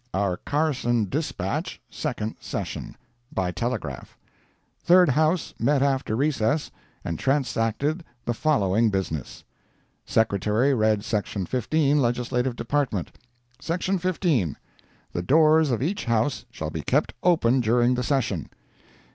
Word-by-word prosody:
OUR 95 -2 0
CARSON 125 - 0
DISPATCH—SECOND 110 - -3
SESSION - - -5 0.3
BY 90 -2 -1
TELEGRAPH 90 - -4 0.7
Third 180 -1 +6
House 155 +4 +1
met 135 +3 +2
after 135 -5 0
recess, 145 +1 0 0.3
and 85 -2 -3
transacted 135 - 0 0.2
the 120 - 0
following 115 -6 +2
business: 95 - -3 0.6
Secretary 110 +5 +2
read 110 -3 +2
Section 105 -4 -2
15, 145 - +1
Legislative 125 +1 0
Department: 120 - -1 0.5
"SECTION 180 +3 -1
15. 165 - 0 0.6
The 85 - -1
doors 155 - +4
of 125 0 0
each 195 +7 -2
house 115 +4 0
shall - - -5
be - - -4
kept - - +1
open 135 -8 +3
during 120 +1 +3
the 125 - -1
session." 120 - -1
125 Hz, 115 wpm, -25 LUFS, 110-150 Hz, 0.7 s, Third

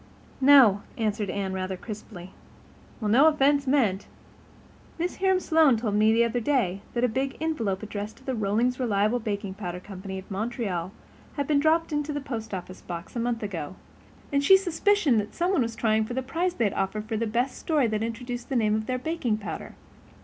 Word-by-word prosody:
"No," 260 -8 +7 0.2
answered 215 -2 -1
Anne, 195 -1 -2
rather 190 0 -3
crisply. 200 -3 -9 0.7
"Well, 210 -3 -1
no 270 +7 +6
offense 285 -2 +3
meant. 225 -9 +2 0.9
Mrs. 350 +2 -2
Hiram 380 -1 +3
Sloane 315 -8 +4
told 220 -2 -2
me 215 +1 +4
the 230 +1 +4
other 235 +1 0
day 220 -7 0
that 240 - 0
a - - +5
big 265 +4 -2
envelope 230 -12 -1
addressed 210 0 -6
to - - -19
the 265 - -1
Rollings 230 +4 0
Reliable 215 -1 +1
Baking 205 -3 -3
Powder 180 -3 -5
Company 190 0 -7
of 190 +2 -10
Montreal 195 -4 -3 0.4
had 285 - -1
been 290 0 +2
dropped 320 +2 +2
into 295 0 -1
the 290 - -2
post 235 -6 -6
office 185 -1 -6
box 170 +3 -7
a - - -1
month 235 -1 -1
ago, 185 -5 -5 0.6
and 280 0 +2
she 385 +7 +8
suspicioned 365 - +2
that 210 0 -5
somebody 350 -2 +1
was 230 -1 -2
trying 220 -1 +1
for 245 - -5
the 260 - -1
prize 340 +7 -1
they'd 210 -5 +1
offered 205 +2 -2
for 220 0 -3
the 225 +1 -1
best 245 +4 0
story 305 -5 +1
that 215 -2 -1
introduced 240 +2 -5
the 270 - -2
name 215 -3 +2
of 215 0 -1
their 255 - -1
baking 255 -5 -1
powder. 210 - -7
230 Hz, 195 wpm, -26 LUFS, 205-275 Hz, 0.9 s, she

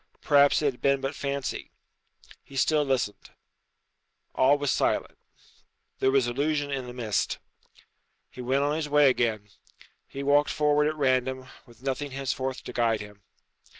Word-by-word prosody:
Perhaps 145 0 +4
it 140 -2 +2
had 125 - -20
been 140 0 +3
but 135 +2 -3
fancy. 140 -2 -4 0.7
He 140 - -15
still 150 +3 +2
listened. 130 -7 -2 1.0
All 135 +3 +4
was 145 -2 0
silent. - - 0 0.8
There 130 - +3
was 135 -2 +3
illusion 145 +4 -1
in 130 -2 -3
the - - -7
mist. 115 -5 -1 0.9
He 125 - -9
went 130 +3 +1
on 145 +1 0
his 155 -1 -3
way 145 -2 +5
again. 110 -4 -1 0.6
He 140 - -6
walked 145 +1 +3
forward 150 0 +2
at 155 - -1
random, 130 -2 0 0.2
with 120 +1 -19
nothing 140 +2 -2
henceforth 130 -1 -3
to - - -8
guide 115 -2 +1
him. 105 -1 -12
135 Hz, 150 wpm, -27 LUFS, 125-145 Hz, 1.0 s, way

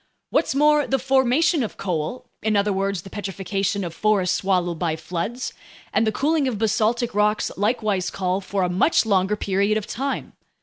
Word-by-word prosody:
What's - - +1
more, 300 0 +4
the 270 - +2
formation 270 +5 +2
of 225 - -4
coal—in 195 +5 -3
other 200 0 +2
words, 195 -2 -1
the 195 - -10
petrification 195 0 -2
of 170 -2 -5
forests 200 -2 +2
swallowed 180 -4 0
by 165 -3 0
floods—and 210 +5 -4
the - - +3
cooling 290 +5 +1
of 240 -5 -2
basaltic 220 +3 +1
rocks 210 +1 +1
likewise 205 -3 0
call 185 0 -1
for 195 0 -2
a - - +2
much 185 - +3
longer 195 -1 +2
period 200 +1 +1
of 215 - -3
time. 270 +4 -4
205 Hz, 165 wpm, -23 LUFS, 190-240 Hz, -, more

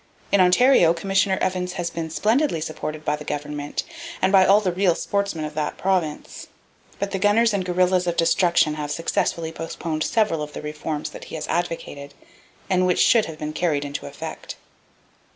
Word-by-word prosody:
In 200 - +5
Ontario, 180 -2 +5
Commissioner 195 +2 +1
Evans 180 -1 -1
has 175 -2 -3
been 165 -1 -4
splendidly 220 - +1
supported 155 0 -5
by 150 - +1
the 150 - -9
Government, 145 0 -4 0.4
and 190 - +2
by 190 -2 +6
all 200 +2 +6
the 195 -4 -1
real 180 -1 +2
sportsmen 200 -6 -2
of 150 - -6
that 150 -1 -3
province; 180 -6 -2 0.5
but 200 0 -3
the 195 - -2
gunners 215 +3 +3
and 200 -2 0
guerrillas 180 0 +1
of 170 - -1
destruction 170 -2 +3
have 150 -1 -4
successfully 165 +1 -1
postponed 165 -1 -4
several 210 -8 +1
of 150 0 -6
the - - -6
reforms 150 0 -4
that - - -10
he - - -8
has 155 - -5
advocated, 155 -5 -3 0.5
and 185 -1 +2
which 180 - +2
should 230 -3 +4
have 160 - -8
been 155 0 -5
carried 155 -4 0
into 140 0 -5
effect. - - -7
170 Hz, 180 wpm, -23 LUFS, 155-190 Hz, 0.5 s, by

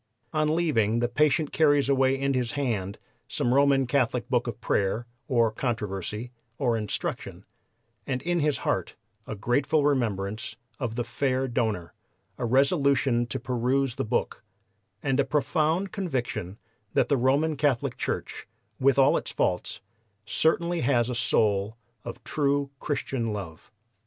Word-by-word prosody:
On 155 0 +2
leaving 115 -11 +2
the 120 +1 +1
patient 150 +4 +2
carries 145 -3 +3
away 135 -1 +3
in 140 0 +1
his 125 0 -1
hand 110 -9 -2 0.3
some 120 - 0
Roman 140 -1 +4
Catholic 125 -2 0
book 125 -1 +2
of 120 - -5
prayer, 105 0 0 0.2
or 115 -4 +3
controversy, 110 -1 -3 0.3
or 120 -4 +1
instruction, 105 -2 -4 0.6
and 130 -2 -1
in 175 0 0
his 150 -2 +1
heart - - -1 0.3
a 110 - -4
grateful 140 +7 +1
remembrance 110 -5 -1 0.2
of 120 -5 -3
the 120 - -1
fair 130 +2 -1
donor, 110 -8 -1 0.5
a 125 - -1
resolution 135 -1 +2
to 110 - -3
peruse 125 +1 0
the 135 +1 -3
book, 115 0 -2 0.6
and 135 -1 +1
a - - +5
profound 155 +6 0
conviction 125 - -3 0.4
that - - +3
the 140 - +3
Roman 140 +5 +2
Catholic 140 -4 0
Church, - - -4 0.3
with 135 0 +3
all 135 +1 +5
its - - -4
faults, 90 - -1 0.4
certainly 170 +7 +1
has 125 -3 +2
a - - -2
soul 105 -3 +1 0.3
of 120 - -8
true 140 -1 0
Christian 130 -6 -2
love. 90 -6 -8
130 Hz, 140 wpm, -27 LUFS, 115-140 Hz, 0.6 s, a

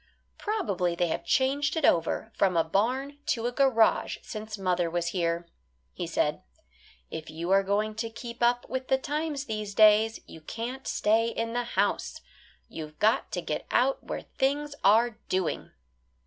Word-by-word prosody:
"Probably 200 - -1
they 175 0 +1
have - - -2
changed 280 +3 +1
it 320 -3 +1
over 170 +6 +1
from 185 -3 +2
a 165 - +4
barn 255 - -1
to 235 -8 0
a 245 - 0
garage 245 -4 +3
since 215 0 -6
mother 180 -3 0
was 170 0 -1
here," 170 -1 -1 0.5
he - - -4
said; - - 0 0.7
"if 160 0 -6
you 165 +3 -4
are 195 0 +6
going 205 +2 0
to 225 0 -2
keep 235 +1 -9
up 240 +1 +2
with 260 0 -4
the 265 - +3
times 295 +1 -3
these 215 -3 -4
days 215 +1 +5
you 160 - -12
can't 235 +10 -6
stay 225 +2 +2
in 230 0 -3
the 245 0 0
house; - - 0 0.5
you've 155 -1 -8
got 220 +2 +2
to - - -2
get - - -3
out - - +2
where - - -4
things 285 +2 -1
are 225 +3 +4
doing." 185 -3 -1
220 Hz, 165 wpm, -28 LUFS, 185-260 Hz, 0.7 s, are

